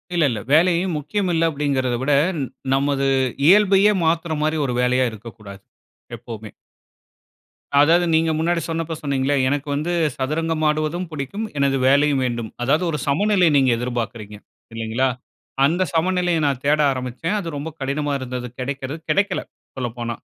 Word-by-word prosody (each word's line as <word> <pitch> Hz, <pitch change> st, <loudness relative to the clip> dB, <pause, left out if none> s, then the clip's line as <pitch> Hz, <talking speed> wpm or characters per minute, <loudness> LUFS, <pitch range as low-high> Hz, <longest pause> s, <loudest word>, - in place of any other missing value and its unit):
இல்ல, 170 Hz, -, +3 dB
இல்ல 115 Hz, -4 st, -3 dB
வேலையும் 170 Hz, +2 st, +3 dB
முக்கியம் 185 Hz, +6 st, -2 dB
இல்ல 165 Hz, 0 st, +2 dB
அப்பிடிங்கிறதவிட, 135 Hz, -3 st, 0 dB, 0.3 s
ந -, -, -1 dB, 0.3 s
நமது 140 Hz, 0 st, +1 dB, 0.4 s
இயல்பையே 200 Hz, +2 st, +6 dB
மாத்துறமாரி 160 Hz, -1 st, 0 dB
ஒரு 125 Hz, -, -2 dB
வேலையா 125 Hz, +1 st, +2 dB
இருக்கக்கூடாது, 105 Hz, -3 st, -11 dB, 0.6 s
எப்பவுமே. 110 Hz, -2 st, -9 dB, 1.3 s
அதாவது, 165 Hz, +4 st, +5 dB
நீங்க 160 Hz, 0 st, +3 dB
முன்னாடி 170 Hz, +1 st, 0 dB
சொன்னப்ப 165 Hz, 0 st, -3 dB
சொன்னீங்களே, 140 Hz, -1 st, 0 dB
எனக்கு 145 Hz, +1 st, -1 dB
வந்து 155 Hz, +4 st, -2 dB, 0.3 s
சதுரங்கமாடுவதும் 155 Hz, +3 st, -1 dB
புடிக்கும், 155 Hz, +9 st, -4 dB
எனது 140 Hz, -1 st, +2 dB
வேலையும் 140 Hz, 0 st, +3 dB
வேண்டும். 120 Hz, -3 st, -3 dB
அதாவது, 150 Hz, +7 st, +2 dB
ஒரு 150 Hz, -, -2 dB
சமநிலைய 185 Hz, +4 st, +3 dB
நீங்க 135 Hz, -2 st, +3 dB
எதிர்பாக்குறீங்க. 115 Hz, -3 st, -4 dB, 0.4 s
இல்லங்களா? 115 Hz, +3 st, 0 dB, 0.6 s
அந்த 170 Hz, +6 st, +2 dB
சமநிலைய 175 Hz, 0 st, +1 dB
நான் 135 Hz, -3 st, 0 dB
தேட 150 Hz, +1 st, +3 dB
ஆரம்பிச்சேன். 130 Hz, -, -3 dB
அது 185 Hz, -, -6 dB
ரொம்ப 145 Hz, +3 st, -4 dB
கடினமா 145 Hz, +2 st, -2 dB
இருந்தது, 125 Hz, -1 st, -5 dB
கெடைக்கிறது 135 Hz, +3 st, -4 dB
கெடைக்கல, 200 Hz, +1 st, +1 dB, 0.4 s
சொல்லப்போனா. 120 Hz, -2 st, -4 dB
145 Hz, 130 wpm, -21 LUFS, 130-165 Hz, 1.3 s, இயல்பையே